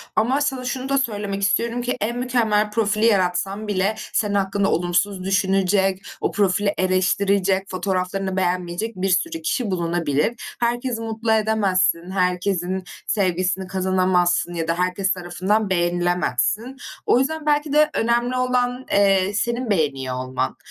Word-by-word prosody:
Ama 255 +6 +2
sana 265 -3 -1
şunu 255 +1 -3
da 275 - +2
söylemek 205 -6 -2
istiyorum 230 +4 +1
ki, 245 +1 -2
en 235 +3 -1
mükemmel 225 -4 +1
profili 215 0 +1
yaratsan 195 0 +1
bile 200 +1 0 0.2
senin 210 -2 +1
hakkında 195 0 +1
olumsuz 180 +3 0
düşünecek, 195 0 +1 0.2
o - - 0
profili 200 0 +1
eleştirecek, 190 +1 +1
fotoğraflarını 190 +1 -2
beğenmeyecek 180 +4 -1
bir 190 +1 -1
sürü 325 - 0
kişi 250 -9 -1
bulunabilir. 170 0 0 0.3
Herkesi 240 0 -1
mutlu 225 0 -2
edemezsin, 195 -5 +1
herkesin 180 0 0 0.2
sevgisini 185 -1 0
kazanamazsın 185 -2 +1
ya 165 -1 -3
da 165 - +1
herkes 185 +2 0
tarafından 185 +4 -1
beğenilemezsin. 175 - 0 0.3
O - - +4
yüzden 310 +3 -2
belki 295 -1 +3
de 305 0 +5
önemli 240 +2 +1
olan, 250 0 0
eee, 195 -1 +3
senin 235 +4 -1
beğeniyor 140 -9 0
olman. 130 0 -3
195 Hz, 135 wpm, -22 LUFS, 185-225 Hz, 0.3 s, de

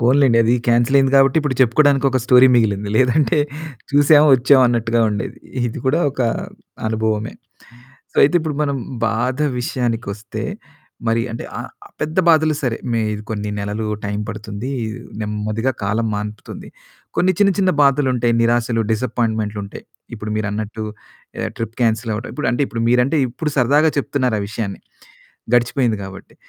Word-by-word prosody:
పోనిలెండి 125 0 +4
అది 120 +2 +3
కాన్సెల్ 120 +3 +3
అయింది 135 0 +2
కాబట్టి 135 +1 +4
ఇప్పుడు 145 -3 -1
చెప్పుకోడానికి 140 +3 +3
ఒక 130 - +1
స్టోరీ 125 +1 +6
మిగిలింది. 105 -3 +1
లేదంటే 145 +6 +3 0.5
చూసాము, 145 +1 +5
వచ్చాం 130 +2 +4
అన్నట్టుగా 115 -1 +1
ఉండేది. 100 -1 -4 0.3
ఇది - - -7
కూడా 150 +6 +2
ఒక 130 - -7 0.7
అనుభవమే. 110 0 -1 0.8
సో - - -18
అయితే 150 - +2
ఇప్పుడు 155 -2 -3
మనం 140 -2 -1 0.3
బాధ 120 +3 -1 0.2
విషయానికొస్తే, 115 -5 -3 0.7
మరి 115 +1 +2
అంటే 115 - -6
ఆహ్, - - -7 0.3
పెద్ద 155 +2 -3
బాధలు 155 -2 +4
సరే 120 -3 0 0.2
మే 115 - +1 0.2
ఇది 105 - -7
కొన్ని 105 -1 -3
నెలలు 105 +2 -3 0.2
టైం 105 0 -2
పడుతుంది, 110 +3 -6 0.5
నెమ్మదిగా 105 +4 -2
కాలం 110 +3 0
మాన్పుతుంది. 105 0 -7 0.5
కొన్ని 185 +1 +3
చిన్న 200 -1 +4
చిన్న 185 -2 +3
బాధలుంటాయి, 130 -4 +2
నిరాశలు, 115 0 +1
డిసప్పాయింట్‌మెంట్లు 110 -2 -1
ఉంటాయి. 100 - -10 0.3
ఇప్పుడు 105 0 -6
మీరన్నట్టు 110 +1 -3 0.5
ఎహ్, - - -2
ట్రిప్ 115 0 -5
కాన్సెల్ 110 0 0
అవ్వడం. 130 +7 -4
అంటే 140 - 0
ఇప్పుడు 115 -1 -3
మీరంటే 125 +5 +2
ఇప్పుడు 150 +5 -4
సరదాగా 145 +5 +4
చెప్తున్నారు 130 -5 0
ఆ - - -2
విషయాన్ని, 105 -2 -5 0.7
గడిచిపోయింది 120 -1 +2
కాబట్టి. 95 0 -11
120 Hz, 145 wpm, -19 LUFS, 110-135 Hz, 0.8 s, స్టోరీ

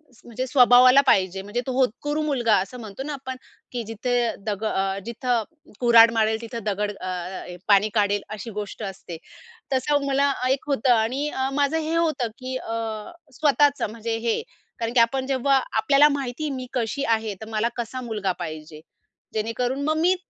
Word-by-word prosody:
स - - -22
म्हणजे 250 +2 -4
स्वभावाला 255 +1 +7
पाहिजे 190 0 +3
म्हणजे 205 +5 -3
तो - - -1
होतकुरू 290 +5 0
मुलगा 250 -8 +2
असं 250 +6 -7
म्हणतो 220 +2 -7
ना 300 +1 -4
आपण 260 -2 -6 0.4
की 245 -2 -3
"जिथे 225 +3 -2 0.3
दग 210 -1 -3
अ, 195 -2 0
जिथं 235 0 -1 0.4
कुर्हाड 235 -2 +7
मारेल 220 0 +1
तिथं 230 -1 -6
दगड 205 0 -1
अ, 195 -2 -9
अ, 185 0 -5
हे 180 - -8
पाणी 205 0 +5
काढेल," 205 -2 +2
अशी 215 +2 -7
गोष्ट 210 +1 -6
असते. 180 -3 -9 0.6
तसं 280 +2 +1
मला 280 +1 +2 0.2
एक 265 +1 0
होतं 270 -3 +2
आणि 245 +6 0
अ, 265 -2 -2
माझं 285 +2 +1
हे 320 +1 -2
होतं 310 -7 +1
की 255 0 -5
अ, 225 +1 -5 0.3
स्वतःचं 290 -4 +3
म्हणजे 225 0 -3
हे 230 - +1 0.4
कारण 230 0 -2
की 245 - +4
आपण 260 +3 +2
जेव्हा 270 0 +2 0.2
आपल्याला 275 +7 +5
माहिती 275 +3 -4
मी 255 - -7
कशी 255 +3 -1
आहे 220 -1 -5
तर 220 - -7
मला 220 +1 0
कसा 240 +2 -4
मुलगा 215 -5 -2
पाहिजे. 155 0 -8 0.5
जेणेकरून 245 +5 -2
मग 310 +1 +1
मी 360 +3 +4
235 Hz, 175 wpm, -24 LUFS, 215-270 Hz, 0.6 s, स्वभावाला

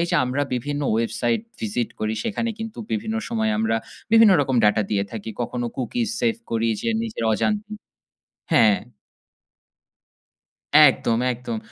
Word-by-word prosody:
এই 170 - +1
যে, - - 0
আমরা 130 +3 -1
বিভিন্ন 145 +4 -3
ওয়েবসাইট 115 - 0 0.2
ভিসিট 110 +2 -2
করি 110 +1 -1
সেখানে 230 +1 -1
কিন্তু 225 0 -7
বিভিন্ন 220 +1 -2
সময় 220 -1 0
আমরা 220 - +1 0.4
বিভিন্ন 225 -3 +7
রকম 130 -2 0
ডাটা 105 +1 +4
দিয়ে 100 -1 +1
থাকি। 110 0 -6
কখনো 120 +1 -3
cookies 225 - -2
সেভ 230 -2 +2 0.2
করি 115 0 +1
যে, - - -2
নিজের 220 - -4
অজান্তে 210 - -1 0.8
হ্যাঁ। 110 -3 +5 2.0
একদম, 130 -5 +5
একদম! 120 -2 -5
130 Hz, 140 wpm, -23 LUFS, -, 2.0 s, বিভিন্ন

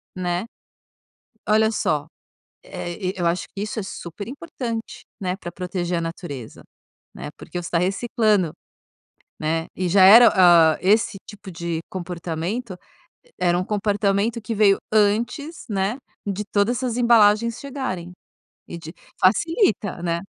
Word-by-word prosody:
Né? 180 +2 -2 1.0
Olha 220 +1 +4
só, 150 -8 -1 0.6
eh, 175 - -6 0.2
e - - -21
eu 175 -2 -1
acho 170 +1 0
que 200 - -6
isso 215 +1 -4
é - - -4
super 195 +2 -8
importante 250 -6 -6 0.2
né, 185 -1 -2
pra 175 -3 -7
proteger 180 0 -3
a - - -2
natureza 165 - -7 0.5
né, - - -7
porque 175 - -7
você 170 - -7
está 170 - 0
reciclando 200 -1 +1 0.9
né, 160 +1 -1
e 185 - -1
já 185 +2 +5
era, 230 +5 +10
hã, 170 -4 +6
esse 210 +2 +2
tipo 205 -2 -10
de 170 -1 -3
comportamento 180 +4 -4 0.6
era 175 -1 +2
um 185 - -1
comportamento 205 +2 0
que 220 +1 -4
veio 200 -2 +4
antes 225 +9 0
né, 200 +3 -1 0.3
de 200 0 -2
todas 205 +4 +1
essas 245 -2 -2
embalagens 235 -1 +4
chegarem, 235 -11 -5 0.6
e 170 - -7
de 165 +1 -10 0.2
facilita 210 - +2
né. 170 -1 -1
195 Hz, 140 wpm, -22 LUFS, 175-220 Hz, 1.0 s, era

